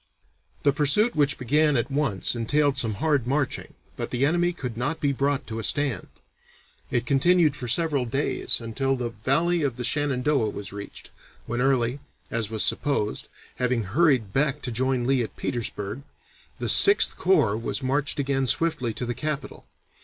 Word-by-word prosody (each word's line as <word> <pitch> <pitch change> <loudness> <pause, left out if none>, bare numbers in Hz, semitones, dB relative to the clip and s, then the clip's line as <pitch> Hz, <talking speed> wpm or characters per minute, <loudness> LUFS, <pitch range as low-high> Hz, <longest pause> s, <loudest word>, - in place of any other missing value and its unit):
The 140 - +3
pursuit 155 - +2
which 145 -2 +2
began 145 +3 +2
at 120 +4 -2
once 135 -9 0
entailed 140 +5 +1
some 115 -6 0
hard 145 0 0
marching, 140 0 -2 0.2
but - - -3
the 125 +2 +1
enemy 175 +3 +1
could 125 -9 -6
not 125 +8 -2
be 145 - +1
brought 140 +1 -1
to 110 -1 -6
a - - -5
stand. 135 -9 +1 0.8
It 120 -1 -1
continued 155 +3 +3
for 125 - -5
several 145 0 +1
days 135 +5 +1
until 135 +4 -1
the 125 -2 -3
Valley 160 +11 +1
of 140 -5 -1
the 125 - -4
Shenandoah 140 -3 +1
was 100 -1 -7
reached, 100 0 -9 0.3
when 120 +1 -3
Early, 130 -1 +1 0.3
as 110 -3 -1
was 110 -1 0
supposed, 135 -8 0 0.3
having 125 -2 0
hurried 120 - +1
back 145 +1 0
to 125 - -3
join 130 +1 -1
Lee 135 0 +2
at 115 - -6
Petersburg, 110 -1 -4 0.6
the - - -3
Sixth 400 0 +6
Corps 155 - +2
was 115 +4 -4
marched 140 +2 0
again 135 -1 0
swiftly 130 -7 0
to 125 - -4
the 120 - -2
capital. 150 +2 -5
135 Hz, 170 wpm, -25 LUFS, 120-145 Hz, 0.8 s, Sixth